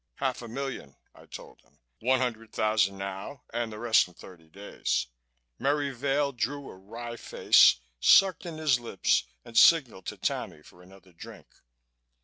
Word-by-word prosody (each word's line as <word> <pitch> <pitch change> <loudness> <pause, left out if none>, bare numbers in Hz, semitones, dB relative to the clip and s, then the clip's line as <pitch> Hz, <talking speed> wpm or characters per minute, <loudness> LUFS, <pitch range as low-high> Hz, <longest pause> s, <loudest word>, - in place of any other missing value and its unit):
"Half 130 -3 -2
a 120 - -8
million," 135 - -6 0.2
I - - -18
told - - -12
him. - - -32 0.2
"One 130 +3 +1
hundred 115 -3 -4
thousand 105 -3 +1
now 100 +7 -7
and 120 -2 -2
the 105 - -8
rest 115 -2 +3
in 90 - -20
thirty 80 -2 -15
days." 100 +5 -3 0.5
Merry 140 0 0
Vail 140 +2 -1
drew 140 +3 -4
a - - -13
wry 115 +5 -8
face, - - +5 0.2
sucked 190 - +5
in 165 -2 -7
his 150 -6 +2
lips 100 - 0 0.2
and 115 - -13
signaled 120 - +4
to - - -5
Tammy 75 - -4
for 90 - -18
another 95 0 -18
drink. 85 - -12
115 Hz, 160 wpm, -28 LUFS, 95-135 Hz, 0.5 s, face